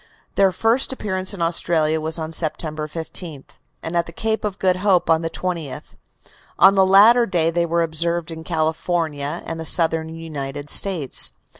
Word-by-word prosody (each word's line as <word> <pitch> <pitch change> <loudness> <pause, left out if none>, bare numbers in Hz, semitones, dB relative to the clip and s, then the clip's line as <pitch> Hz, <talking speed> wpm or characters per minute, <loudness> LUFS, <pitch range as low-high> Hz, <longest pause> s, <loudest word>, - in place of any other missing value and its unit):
Their 195 -1 +3
first 225 +8 +1
appearance 190 -6 -2
in 190 -5 -3
Australia 160 -2 +1
was 160 +1 -1
on 160 0 -5
September 155 -1 -1
15th, 160 -2 -7 0.3
and 165 +2 -5
at 170 -1 +1
the - - -8
Cape 220 +5 -2
of 205 -2 -3
Good 185 -1 +1
Hope 185 -3 +2
on 160 0 +3
the 165 - -3
20th. 170 -6 -5 0.6
On 195 - +7
the 190 -1 +3
latter 225 +5 +6
day 165 -3 +1
they 170 0 0
were 170 +1 +1
observed 170 +1 -1
in 160 0 -8
California 160 -2 -2
and 165 0 -5
the - - -4
Southern 160 -1 +2
United 145 -3 -6
States. 175 -9 +1
165 Hz, 170 wpm, -21 LUFS, 160-185 Hz, 0.6 s, On